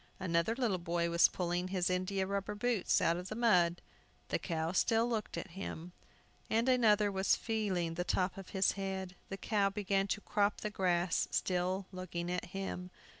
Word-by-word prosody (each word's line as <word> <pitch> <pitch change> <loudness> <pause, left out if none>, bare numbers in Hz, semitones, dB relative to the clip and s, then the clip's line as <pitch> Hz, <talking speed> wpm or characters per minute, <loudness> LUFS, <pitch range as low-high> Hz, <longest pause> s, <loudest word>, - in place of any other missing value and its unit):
Another 170 +4 +1
little 230 -8 0
boy 170 0 -1
was 170 0 +6
pulling 180 0 -2
his 185 -2 0
india 185 +1 0
rubber 200 +1 -2
boots 225 -2 +1
out 165 +1 +2
of 180 +1 -6
the 215 - -4
mud. 180 -7 +3 0.5
The - - 0
cow 165 -2 -2
still 225 +5 +3
looked 225 -3 -2
at 190 - -6
him. 180 -2 -6 0.6
Another 225 -3 +4
was 190 0 +2
feeling 195 -7 -1
the 175 +2 -2
top 180 +1 0
of 195 -1 -9
his 190 -1 +2
head. 190 -1 -4
The 195 - -4
cow 200 -1 +1
began 195 -1 0
to 205 - -2
crop 205 0 0
the 210 - -3
grass, 175 -3 +1
still 185 +1 0
looking 175 -2 -4
at 180 - -2
him. 185 -1 -5
190 Hz, 175 wpm, -34 LUFS, 175-205 Hz, 0.6 s, was